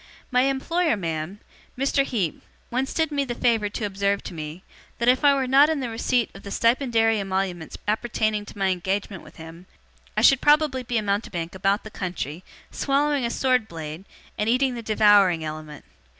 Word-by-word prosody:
'My 250 +1 +3
employer, 320 +1 0
ma'am 165 +2 -4 0.4
Mr. 275 +1 +2
Heep 200 - -2 0.3
once 260 +2 -1
did 320 -2 0
me 285 -1 0
the 245 -3 -4
favour 225 -4 +1
to 210 +1 -4
observe 200 0 -1
to - - -7
me, 155 +2 -7 0.3
that 235 - -1
if 255 +2 +4
I 285 -1 +6
were 270 -1 0
not 275 +4 +5
in 315 -2 0
the 250 -3 -3
receipt 235 +1 0
of 195 - -12
the 200 - -9
stipendiary 230 -1 +2
emoluments 190 -3 -3
appertaining 215 -1 0
to - - -11
my 195 -1 +1
engagement 190 +1 -2
with - - -16
him, 165 +3 -11 0.5
I - - +2
should 270 -1 +6
probably 295 -3 +3
be 240 -1 -2
a 215 - 0
mountebank 200 -5 -2
about 195 +2 0
the 220 - -10
country, 175 -4 -5 0.3
swallowing 280 -1 +1
a - - 0
sword 250 -2 +1
blade, 160 +1 -7 0.3
and 210 +1 +1
eating 255 +2 +2
the 235 - -5
devouring 205 -6 +4
element. 155 -1 -7
215 Hz, 185 wpm, -24 LUFS, 190-255 Hz, 0.5 s, I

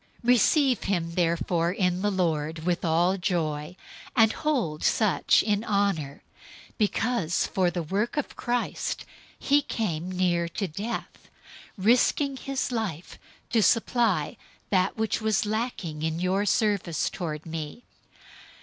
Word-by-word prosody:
002:029 - - -8
Receive 255 +2 +4
him 175 -4 -1
therefore 170 0 +1
in 180 -1 0
the 205 - +2
Lord 160 -4 -1
with 175 -1 0
all 175 +3 +2
joy, 160 -3 -2 0.4
and 225 -3 +5
hold 240 - -1
such 215 -4 +3
in 210 -1 0
honor, 200 -10 -1 0.5
002:030 - - -28
because 215 -4 +1
for 185 -2 +1
the 175 -1 -3
work 205 - -2
of 295 - -2
Christ 245 0 -2 0.3
he 285 +1 +3
came 185 - -3
near 175 -2 +1
to 195 +3 -3
death, 200 +9 -6 0.5
risking 250 +7 +3
his 270 0 -3
life 205 -9 -4 0.3
to 230 - +3
supply 225 -7 +2 0.3
that 185 -1 +2
which 220 0 -1
was 215 -2 +1
lacking 210 -8 -3
in 160 +1 -1
your 190 +3 0
service 200 -7 +1
toward 155 -4 -4
me. 160 +7 -6
190 Hz, 130 wpm, -26 LUFS, 170-225 Hz, 0.5 s, and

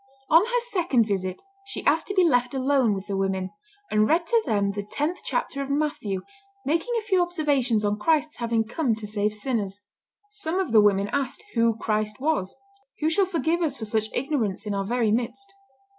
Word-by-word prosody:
On 330 +4 +7
her 485 +2 +1
second 330 - +2
visit 190 - -2 0.2
she 395 - -6
asked - - +2
to 395 - -3
be 370 - +5
left 245 -5 +2
alone 260 -5 +2
with 195 0 -6
the 200 -1 -3
women, 190 -1 -1 0.4
and 215 0 +3
read 335 +2 +2
to 460 +5 +2
them 200 -2 +1
the 205 +1 -4
tenth 295 - -2
chapter 280 - -2
of 275 - -4
Matthew, 280 -10 -1 0.4
making 330 - 0
a 450 - -2
few 380 -4 +2
observations 285 -11 +1
on 205 +1 0
Christ's 305 +3 +1
having 230 -1 0
come 235 +1 0
to 220 -1 -7
save 210 0 0
sinners. 210 -4 -2 0.5
Some 380 -4 -1
of 370 -10 -1
the 220 -2 +7
women 200 -1 +3
asked 280 - -2
who 230 -1 +2
Christ 215 -1 -1
was. 280 -10 -1 0.5
Who 310 +1 +2
shall 380 +3 +2
forgive 340 -1 0
us 295 -5 0
for 220 - -5
such 215 0 0
ignorance 245 -7 -1
in 210 - -2
our 195 -1 -1
very 230 0 +1
midst? 250 - -2
245 Hz, 195 wpm, -25 LUFS, 210-320 Hz, 0.5 s, On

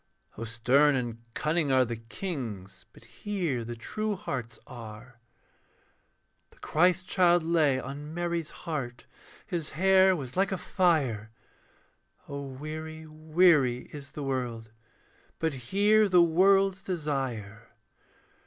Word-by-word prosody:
(O 115 - -5
stern 125 +6 +3
and 120 -3 -3
cunning 155 -1 0
are 130 -1 +4
the 120 -1 -4
kings, 115 - -6
But - - -18
here 175 - -3
the 120 +1 -6
true 215 - -3
hearts 125 - -5
are.) 115 0 -11 1.3
The - - -24
Christ 180 +3 +2
child 175 -2 +4
lay 155 -5 +2
on 145 +3 -7
Mary's 170 -1 -2 0.2
heart, 135 -8 -4 0.4
His 165 -3 -3
hair 190 +1 +5
was 135 -6 -6
like 195 +2 +1
a 190 - -1
fire. 145 - +1 1.0
(O 140 0 -5
weary, 155 +4 -7
weary 155 -5 +2
is 140 -2 -9
the 150 - -5
world, 120 -4 -3 0.7
But 160 -2 -1 0.2
here 210 +1 +4
the 180 -2 +6
world's 190 +3 +3
desire.) 130 - -4
150 Hz, 120 wpm, -28 LUFS, 125-175 Hz, 1.3 s, the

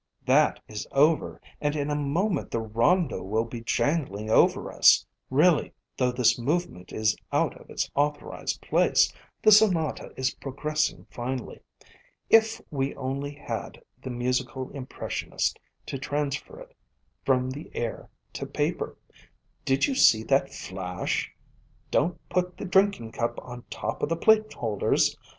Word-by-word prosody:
"That - - +4
is 105 -1 -6
over, 150 +3 +3 0.2
and 145 0 0
in 145 0 -1
a - - +1
moment 160 +8 0
the 115 - -1
Rondo 115 - +1
will 110 +4 -1
be 115 0 -7
jangling 115 - -1
over - - +3
us. - - +6 0.2
Really, 155 +4 +3 0.2
though 125 -1 +1
this 125 -1 +3
movement 130 - -2
is 110 -1 +1 0.2
out - - +1
of - - -18
its - - -2
authorized 145 +1 -2
place, - - +3 0.3
the 215 - +7
Sonata 190 -7 +4
is 130 +1 0
progressing 150 +3 -2
finely. 125 0 -5 0.7
If 225 0 +5
we 135 -1 -1
only 140 +2 -4
had 150 - -6 0.2
the - - -6
musical 125 +1 -2
impressionist 135 -2 -3 0.3
to 135 - -5
transfer 145 - -3
it - - -13 0.5
from 130 -1 +2
the 145 +4 -8
air 115 -1 -4 0.2
to - - -5
paper! - - -2 0.7
Did 135 0 +3
you 280 - -1
see 110 - +5
that 135 +2 +2
flash? 90 -1 -3 0.6
Don't 170 +2 +1
put 180 +2 -1
the - - -5
drinking 190 - +2
cup 115 +1 -2
on 120 -1 -9
top - - -4
of - - 0
the 165 - 0
plate 215 +3 +4
holders 110 -4 +1
135 Hz, 140 wpm, -27 LUFS, 120-160 Hz, 0.7 s, the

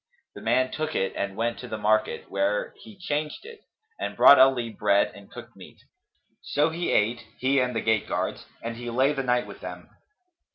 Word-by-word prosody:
The - - -11
man 130 0 +1
took 155 0 -3
it 95 - 0
and 100 -1 -3
went 115 +1 -1
to 125 - -8
the 110 - -4
market, 110 +1 +1
where 100 +1 -1
he 215 -3 -14
changed 150 - -3
it, 460 -1 -11 0.4
and - - -4
brought 140 - +8
Ali 130 -3 +4
bread 100 -2 +2
and 100 -1 -14
cooked - - -12
meat: - - -14 0.6
so 150 +2 +1
he 170 +2 -2
ate, 115 +3 +1
he 135 +2 +2
and 125 -1 0
the 115 - 0
gate 110 -2 +1
guards, - - -3 0.2
and 115 0 -5
he 120 0 -6
lay 130 +5 +2
the 135 - -2
night 125 -1 +1
with - - -11
them. - - -9
125 Hz, 200 wpm, -26 LUFS, 110-140 Hz, 0.6 s, brought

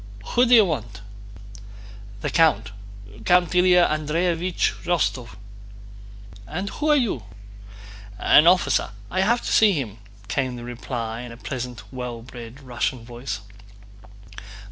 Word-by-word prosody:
"Who 245 +1 +3
do 245 - +7
you 220 -3 +7
want?" 115 - -4 1.2
"The - - -2
count—Count 110 - +1
Ilyá 180 -1 +5
Andréevich 165 +4 -1
Rostóv." 140 -9 -1 1.1
"And 180 - -4
who 305 0 -2
are 300 - +6
you?" 235 - 0 1.0
"An 155 +7 +5
officer, 180 +1 +3 0.2
I 185 - +1
have 235 +5 +2
to - - -3
see 215 -2 +5
him," 115 - -4 0.3
came 130 +6 -1
the 120 - -8
reply 120 -1 -5
in 125 -1 -8
a 115 - -10
pleasant, 125 -2 -6
well 125 -2 -6
bred 120 +1 -11
Russian 120 -1 -3
voice. 120 -4 -6
130 Hz, 120 wpm, -23 LUFS, 115-180 Hz, 1.2 s, do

